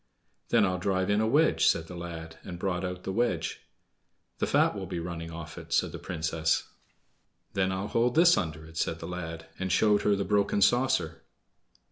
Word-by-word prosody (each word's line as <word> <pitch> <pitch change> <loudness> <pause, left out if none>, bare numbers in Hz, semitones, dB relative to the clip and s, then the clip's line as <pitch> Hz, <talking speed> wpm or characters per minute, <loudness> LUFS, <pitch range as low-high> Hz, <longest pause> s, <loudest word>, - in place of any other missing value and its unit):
"Then - - +4
I'll 90 0 -1
drive 95 +1 0
in 105 +1 +3
a 110 - +2
wedge," 150 +7 +3
said 80 - +2
the 90 - -9
lad, 80 -1 -7
and 90 -2 -7
brought 90 0 -2
out 90 0 -4
the 95 - -3
wedge. 120 +4 -1 0.8
"The - - +1
fat - - +3
will 95 -2 -5
be 90 -1 -4
running 85 -1 -5
off 80 -1 -8
it," - - -12
said - - +2
the - - -7
Princess. 80 -1 -1 0.9
"Then 95 -1 +1
I'll 95 +2 -2
hold 120 +3 +1
this 175 +1 +7
under 80 -2 -3
it," 80 +1 -12
said 80 - 0
the - - -8
lad, 85 -2 -6
and 95 0 -2
showed 105 +3 +4
her 105 - +3
the 100 0 -2
broken 100 -1 +2
saucer. 100 -7 +2
90 Hz, 195 wpm, -28 LUFS, 80-100 Hz, 0.9 s, this